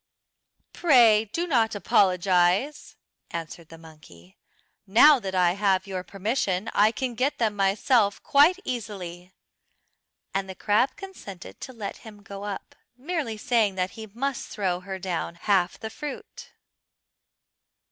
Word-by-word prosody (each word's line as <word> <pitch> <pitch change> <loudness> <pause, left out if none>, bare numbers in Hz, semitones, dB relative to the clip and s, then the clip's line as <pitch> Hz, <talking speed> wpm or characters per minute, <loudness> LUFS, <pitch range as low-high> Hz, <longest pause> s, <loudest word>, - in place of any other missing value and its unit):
"Pray 235 -9 +5
do 330 +12 -3
not 230 -9 +1
apologise," 185 - +2 0.3
answered 165 0 -7
the 165 - -12
monkey. 155 - -17 0.5
"Now 270 +8 +7
that 190 -4 -5
I 180 -1 +4
have 195 -1 +1
your 190 -2 -4
permission 195 0 -2
I 210 +2 +4
can 255 +1 -3
get 260 +5 -1
them 220 -3 0
myself 200 +2 +2
quite 300 +6 +5
easily." 185 -7 -6 1.0
And 195 0 -2
the 190 - -7
crab 220 +8 +1
consented 380 - -10
to 260 - -7
let 220 -5 -6
him 210 -2 -14
go 200 0 -8
up, 205 -1 -6 0.2
merely 280 -5 -3
saying 215 -3 +1
that 185 0 -1
he 220 -1 -9
must 250 +5 -4
throw 185 -3 -2
her 190 +1 -6
down 175 -2 -4
half 185 0 0
the 220 -1 -6
fruit. 295 +4 -8
205 Hz, 135 wpm, -25 LUFS, 185-240 Hz, 1.0 s, Now